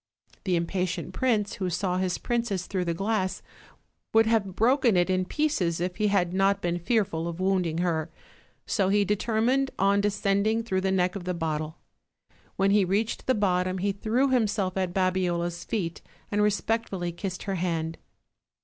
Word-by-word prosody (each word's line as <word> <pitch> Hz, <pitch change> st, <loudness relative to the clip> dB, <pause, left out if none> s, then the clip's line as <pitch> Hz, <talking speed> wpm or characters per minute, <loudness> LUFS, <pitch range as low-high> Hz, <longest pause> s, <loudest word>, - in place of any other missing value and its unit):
The 185 Hz, -2 st, +2 dB
impatient 180 Hz, +1 st, -2 dB
prince, 215 Hz, -3 st, 0 dB
who 185 Hz, -2 st, -1 dB
saw 180 Hz, +1 st, -1 dB
his 185 Hz, -1 st, 0 dB
princess 230 Hz, -6 st, -1 dB
through 185 Hz, -2 st, -2 dB
the 170 Hz, -, 0 dB
glass, 195 Hz, 0 st, -1 dB, 0.7 s
would 225 Hz, 0 st, +6 dB
have 215 Hz, -5 st, +1 dB
broken 240 Hz, -2 st, +3 dB
it 175 Hz, +1 st, +2 dB
in 185 Hz, 0 st, +1 dB
pieces 195 Hz, -, 0 dB
if 180 Hz, 0 st, -2 dB
he 210 Hz, -, +2 dB
had 185 Hz, -4 st, +1 dB
not 195 Hz, +1 st, +2 dB
been 175 Hz, -2 st, -1 dB
fearful 180 Hz, -4 st, 0 dB
of 170 Hz, 0 st, -5 dB
wounding 185 Hz, -4 st, +1 dB
her; 170 Hz, -2 st, 0 dB, 0.6 s
so 195 Hz, -4 st, +1 dB
he 205 Hz, 0 st, +3 dB
determined 230 Hz, +6 st, +1 dB
on 200 Hz, +1 st, +3 dB
de 205 Hz, -, +2 dB
scending 205 Hz, +3 st, +1 dB
through 190 Hz, -4 st, 0 dB
the 190 Hz, 0 st, 0 dB
neck 185 Hz, 0 st, +1 dB
of 190 Hz, -3 st, -6 dB
the 180 Hz, -1 st, -1 dB
bottle. 155 Hz, -1 st, -3 dB, 0.8 s
When 195 Hz, +1 st, +2 dB
he 205 Hz, 0 st, +5 dB
reached 200 Hz, +5 st, -1 dB
the 260 Hz, -, +3 dB
bottom 185 Hz, -2 st, +1 dB
he 200 Hz, +2 st, 0 dB
threw 225 Hz, +7 st, +1 dB
himself 210 Hz, -7 st, +1 dB
at 185 Hz, -2 st, -1 dB
Babiola's 175 Hz, -2 st, 0 dB
feet 170 Hz, -7 st, -3 dB, 0.3 s
and 210 Hz, 0 st, +1 dB
respectfully 210 Hz, -3 st, 0 dB
kissed 180 Hz, +2 st, -5 dB
her 195 Hz, -, -2 dB
hand. 165 Hz, -2 st, -2 dB
190 Hz, 170 wpm, -27 LUFS, 180-210 Hz, 0.8 s, would